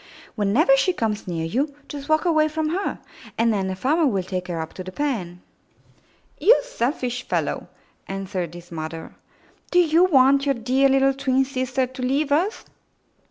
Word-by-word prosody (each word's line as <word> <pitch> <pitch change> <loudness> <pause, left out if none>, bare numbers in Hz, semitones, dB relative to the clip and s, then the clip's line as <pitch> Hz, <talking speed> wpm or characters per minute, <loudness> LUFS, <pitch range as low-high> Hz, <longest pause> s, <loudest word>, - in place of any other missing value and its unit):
''Whenever 240 - +3
she 360 +7 +2
comes 220 - -2
near 165 -2 -2
you, 275 - -1
just 285 0 -8
walk 310 +2 +2
away 310 -3 +3
from 310 0 -2
her, 375 +5 -2 0.4
and 230 0 +3
then 195 -2 -1
the 190 - -3
farmer 295 - +2
will 195 -7 0
take 180 -1 -4
her 170 -2 -3
up 160 0 -5
to 185 - -7
the 185 - -8
pen.'* 185 -10 -3 1.0
''You 480 - +6
selfish 250 - -2
fellow - - -2 0.4
T' - - -5
answered 185 -3 -4
his 175 0 -12
mother. 160 0 -6 0.6
"Do 355 - +1
you 340 0 +5
want 275 -3 +4
your 275 - +2
dear 260 +4 +2
little 270 0 +3
twin 270 -1 +1
sister 260 0 -1
to 255 +1 -9
leave 275 +3 0
us?'' 355 +9 0
260 Hz, 175 wpm, -23 LUFS, 195-295 Hz, 1.0 s, You